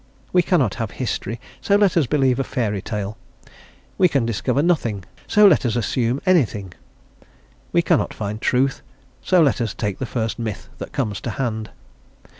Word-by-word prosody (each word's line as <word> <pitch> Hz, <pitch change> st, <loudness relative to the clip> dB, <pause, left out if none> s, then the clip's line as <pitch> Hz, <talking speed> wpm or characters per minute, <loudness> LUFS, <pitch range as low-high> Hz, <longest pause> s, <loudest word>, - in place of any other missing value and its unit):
We 180 Hz, -, +6 dB
cannot 170 Hz, -6 st, +2 dB
have 115 Hz, -, -2 dB
history, 120 Hz, -2 st, -3 dB, 0.2 s
so 200 Hz, -, +2 dB
let 200 Hz, -3 st, +3 dB
us 160 Hz, -7 st, +3 dB
believe 135 Hz, -3 st, +2 dB
a -, -, +2 dB
fairy 115 Hz, -7 st, -2 dB
tale; 105 Hz, 0 st, -4 dB, 0.8 s
we 185 Hz, -, +6 dB
can 140 Hz, -7 st, +1 dB
discover 115 Hz, +5 st, 0 dB
nothing, 120 Hz, -, 0 dB, 0.2 s
so 210 Hz, 0 st, +5 dB
let 185 Hz, -8 st, +6 dB
us 120 Hz, -3 st, 0 dB
assume 120 Hz, +3 st, 0 dB
anything; 110 Hz, -, +1 dB, 1.0 s
we -, -, +3 dB
cannot -, -, +2 dB
find 105 Hz, +1 st, -5 dB
truth, 135 Hz, +2 st, +1 dB, 0.4 s
so 180 Hz, -3 st, +4 dB
let 140 Hz, -3 st, +2 dB
us 110 Hz, -3 st, -2 dB
take 105 Hz, -3 st, -3 dB
the 130 Hz, -, -3 dB
first 115 Hz, -1 st, -2 dB
myth 110 Hz, -4 st, -5 dB
that -, -, -6 dB
comes 105 Hz, -3 st, -2 dB
to -, -, -4 dB
hand. 110 Hz, -4 st, -3 dB
120 Hz, 170 wpm, -21 LUFS, 110-145 Hz, 1.0 s, We